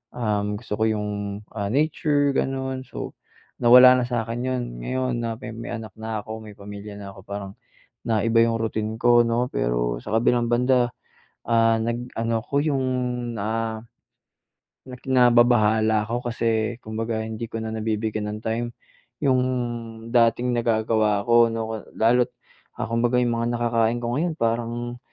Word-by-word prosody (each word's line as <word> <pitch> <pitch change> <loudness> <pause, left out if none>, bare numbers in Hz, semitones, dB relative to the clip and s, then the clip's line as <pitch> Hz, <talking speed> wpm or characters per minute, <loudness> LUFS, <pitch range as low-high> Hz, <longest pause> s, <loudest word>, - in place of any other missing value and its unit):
uhm, 105 -3 -1
gusto - - -6
ko - - +2
yung, 105 -1 -1 0.5
ah, 100 -2 -2
nature 145 0 +2
gano'n. 130 -1 -2
So, - - -6 0.5
nawala 125 +1 +8
na - - -1
sa'kin 115 -1 -2
'yon, 130 -1 -1 0.2
ngayon 130 - -1
na 115 -1 -2
may 120 - -7
may 115 +1 -7
anak 110 -4 -8
na 110 -1 -4
ako 110 0 -7
may 105 -2 -11
pamilya 100 +1 -9
na 100 -1 -8
ako 95 - -13
parang, 100 -1 -5 0.6
na 110 -3 +1
iba 115 0 +3
yung 115 0 +2
routine 110 -1 -2
ko 120 0 +5
'no, 120 +2 0
pero - - 0
sa 105 - -4
kabilang 120 +1 +2
banda, 125 +1 +3 0.5
ah, 115 -1 +3
nag-ano 115 0 -2
ko 140 +4 -2
yung 140 -4 0 0.5
na 110 +2 -2 1.1
na 125 - -7 0.3
nababahala 110 -2 +4
ako 120 +1 -2
kasi 115 -1 0
kumbaga 110 +1 -3
hindi 110 +1 -5
ko 115 - -3
na 110 - -4
nabibigyan 110 -1 -2
ng 105 - -6
time, 115 +2 -1 0.6
yung 130 -3 +3 0.7
dating 120 +1 +3
nagagawa 110 -3 +1
ko 120 0 +6
'no. 110 -1 -4
Lalo't, 120 +2 +3 0.5
ah, - - -3
kumbaga 120 +1 +2
yung 120 -1 +1
mga 115 - 0
nakakain 115 0 +1
ko 120 +1 -1
ngayon 170 +1 0
parang, 120 +1 -2
115 Hz, 155 wpm, -24 LUFS, 110-120 Hz, 1.1 s, nawala